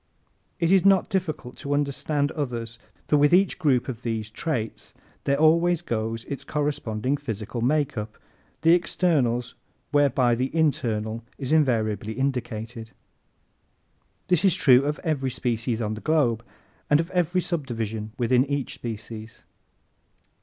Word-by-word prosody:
It 170 0 +2
is 190 -2 +5
not 195 -1 +4
difficult 155 -9 -3
to 145 0 -2
understand 145 +1 0
others 120 -6 -4 0.3
for 150 - +4
with 145 +4 +5
each 195 +1 +2
group 135 -8 +2
of 120 -3 -5
these 110 -2 -3
traits 120 -4 -3 0.3
there 140 0 +2
always 170 +2 +3
goes 115 -3 -2
its 140 - -6
corresponding 140 -4 -1
physical 115 -1 -5
makeup 130 -5 0 0.4
the 165 +1 +6
externals 140 -9 +1 0.4
whereby 135 -4 +3
the 125 +3 0
internal 115 -8 0
is 135 -1 -4
invariably 110 -8 +1
indicated. 120 -3 -3 1.3
This 180 -1 +2
is 190 -4 +4
true 130 0 +5
of 150 +2 -1
every 145 -6 0
species 120 -1 -2
on 105 0 -2
the 110 - -7
globe 140 -8 +1 0.5
and 150 - +5
of 165 +2 -2
every 180 0 +1
subdivision 115 - -3
within 125 +1 +3
each 140 -2 -2
species. 110 -1 -8
130 Hz, 130 wpm, -25 LUFS, 115-155 Hz, 1.3 s, the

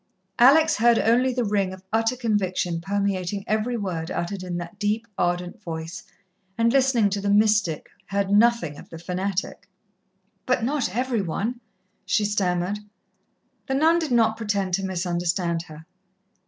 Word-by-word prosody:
Alex 300 +5 +6
heard 235 +1 +4
only 245 +4 +3
the 250 0 -1
ring 200 -3 0
of 185 0 -10
utter 225 +2 +2
conviction 185 -7 -1
permeating 195 0 -2
every 220 +3 0
word 175 -6 -3
uttered 185 +2 -3
in 180 -1 -4
that 175 +4 -8
deep, 210 +2 0
ardent 175 +4 -2
voice, 165 -1 -6 0.6
and 230 +1 +2
listening 260 -5 +3
to 200 0 -2
the 200 - -1
mystic, 210 -6 +2 0.2
heard 200 0 -1
nothing 210 -8 +3
of - - -13
the 165 - -9
fanatic. 185 +3 -3 0.8
"But 225 - +1
not 270 -3 0
every 250 -3 0
one," 215 +8 -3 0.4
she 210 - +1
stammered. 195 -1 0 0.9
The 265 - 0
nun 325 +4 +4
did 315 -5 -3
not 225 -2 +3
pretend 200 -4 -1
to 195 +2 +1
misunderstand 175 -2 -1
her. 155 0 -12
200 Hz, 150 wpm, -24 LUFS, 180-230 Hz, 0.9 s, Alex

